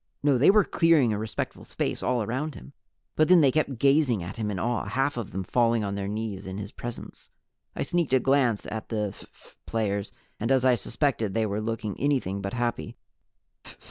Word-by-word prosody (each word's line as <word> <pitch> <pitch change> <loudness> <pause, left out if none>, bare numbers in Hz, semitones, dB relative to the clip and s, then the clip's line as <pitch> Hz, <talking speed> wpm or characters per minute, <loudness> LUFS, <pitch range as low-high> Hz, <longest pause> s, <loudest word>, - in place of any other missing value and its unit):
No, 140 -4 +3
they 135 - +6
were 210 +1 +6
clearing 160 -10 +3
a 105 - -2
respectful 110 0 -4
space - - -3
all 125 -3 0
around 130 +8 -3
him, 140 - -12 0.4
but 155 - +3
then 180 -2 +7
they 140 -3 +5
kept 140 -3 0
gazing 135 - +3
at 90 +6 -7
him 110 -2 -2
in 100 - -3
awe, 115 +2 -1
half 135 +7 0
of 120 -5 -4
them 95 - -4
falling 115 +2 +2
on 100 -1 -2
their 100 -1 -3
knees 105 -2 -4
in 95 +1 -5
his 105 0 -6
presence. 120 -1 -8 0.5
I - - -1
sneaked 170 -6 0
a 130 - +6
glance 130 -4 +2
at 110 +1 -6
the 105 -3 -1
phph - - -17
players, 100 -2 -1 0.3
and 115 +4 -1
as 130 -1 +3
I 130 - +6
suspected 115 -2 -1
they 110 -1 +2
were 105 0 -2
looking 110 -2 -3
anything 130 -9 0
but 100 0 -4
happy. 120 -1 -2
115 Hz, 205 wpm, -26 LUFS, 105-135 Hz, 0.5 s, then